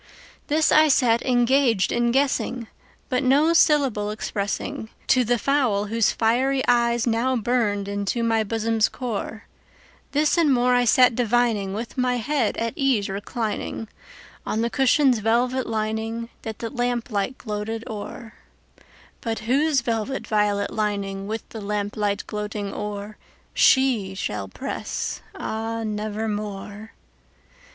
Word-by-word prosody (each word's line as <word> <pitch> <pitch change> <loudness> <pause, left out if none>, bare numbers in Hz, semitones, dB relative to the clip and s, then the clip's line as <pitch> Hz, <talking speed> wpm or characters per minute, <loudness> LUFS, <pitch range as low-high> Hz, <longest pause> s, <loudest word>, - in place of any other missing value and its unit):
This 310 +1 +2
I 310 0 +6
sat 240 -5 +3
engaged 245 -3 +2
in 240 0 +1
guessing, 255 -2 0 0.4
but 255 -1 0
no 290 +5 +4
syllable 275 -10 +3
expressingTo 215 +4 -2
the 240 +1 +1
fowl 240 -5 +1
whose 230 -4 +3
fiery 260 +4 +1
eyes 235 -1 +3
now 240 +2 +1
burned 220 -4 0
into 200 +3 -2
my 225 -1 +2
bosom's 225 +1 +1
core; 225 -3 -5 0.7
This 300 +3 +2
and 310 -4 +4
more 250 -1 +3
I 245 0 +3
sat 250 +2 +5
divining, 230 -4 +1
with 230 +4 -5
my 250 0 +2
head 245 0 0
at 230 0 -2
ease 255 -8 +1
recliningOn 215 +2 -4 0.7
the 230 +2 0
cushion's 265 -2 +3
velvet 245 +4 +1
lining 225 +1 -2
that 220 -1 -6
the 230 - -5
lamplight 245 -2 -2
gloated 220 +1 -4
o'er, 220 +1 -7 0.9
But 225 -1 -3
whose 275 +5 +2
velvet 235 +2 -2
violet 205 -1 +1
lining 200 -2 -2
with 220 +1 -4
the 220 - -8
lamp 205 0 -3
light 205 -1 -1
gloating 210 -1 -4
o'erShe 210 +1 0
shall 105 - -3
press, 95 - -4
ah, 225 +1 -3
nevermore! 210 -1 -4
225 Hz, 125 wpm, -23 LUFS, 210-250 Hz, 0.9 s, I